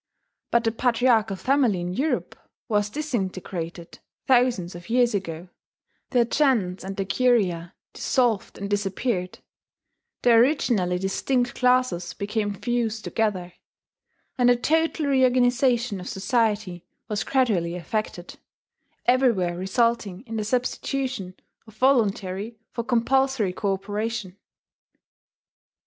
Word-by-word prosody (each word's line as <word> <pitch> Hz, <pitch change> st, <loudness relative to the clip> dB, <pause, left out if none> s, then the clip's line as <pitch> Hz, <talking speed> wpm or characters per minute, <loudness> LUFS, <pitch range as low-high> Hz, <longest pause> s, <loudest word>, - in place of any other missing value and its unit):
But 235 Hz, 0 st, +2 dB
the 225 Hz, -, +1 dB
patriarchal 230 Hz, -3 st, +2 dB
family 255 Hz, -3 st, +2 dB
in 175 Hz, +1 st, -3 dB
Europe 285 Hz, +9 st, -1 dB, 0.3 s
was 210 Hz, -3 st, +1 dB
disintegrated 190 Hz, -, -4 dB, 0.3 s
thousands 240 Hz, -9 st, +2 dB
of 175 Hz, 0 st, -11 dB
years 240 Hz, 0 st, +3 dB
ago; 175 Hz, -3 st, -4 dB, 0.6 s
the 245 Hz, -2 st, +3 dB
gens 230 Hz, -10 st, +1 dB
and 195 Hz, +1 st, -6 dB
the 195 Hz, -, -1 dB
curia 190 Hz, -8 st, +1 dB, 0.2 s
dissolved 240 Hz, -6 st, 0 dB
and 200 Hz, -, -4 dB
disappeared; 200 Hz, -1 st, -2 dB, 0.9 s
the 245 Hz, -, +5 dB
originally 230 Hz, -, +3 dB
distinct 245 Hz, +6 st, 0 dB
classes 250 Hz, -9 st, +1 dB
became 205 Hz, 0 st, -2 dB
fused 225 Hz, 0 st, -2 dB
together; 190 Hz, -5 st, -1 dB, 0.9 s
and 245 Hz, 0 st, +5 dB
a 245 Hz, -, +6 dB
total 320 Hz, +4 st, +1 dB
reorganization 250 Hz, -4 st, +2 dB
of 180 Hz, -, -7 dB
society 205 Hz, -4 st, 0 dB, 0.2 s
was 210 Hz, -1 st, -2 dB
gradually 205 Hz, -11 st, +1 dB
effected, 180 Hz, 0 st, -4 dB, 0.7 s
everywhere 235 Hz, -9 st, +2 dB
resulting 195 Hz, +1 st, 0 dB
in 225 Hz, -, -6 dB
the 215 Hz, -, -1 dB
substitution 250 Hz, -3 st, -2 dB, 0.3 s
of 220 Hz, -1 st, -16 dB
voluntary 220 Hz, -4 st, +1 dB
for 235 Hz, -, -3 dB
compulsory 245 Hz, -3 st, +1 dB
cooperation. 205 Hz, +1 st, -3 dB
220 Hz, 105 wpm, -24 LUFS, 190-245 Hz, 0.9 s, a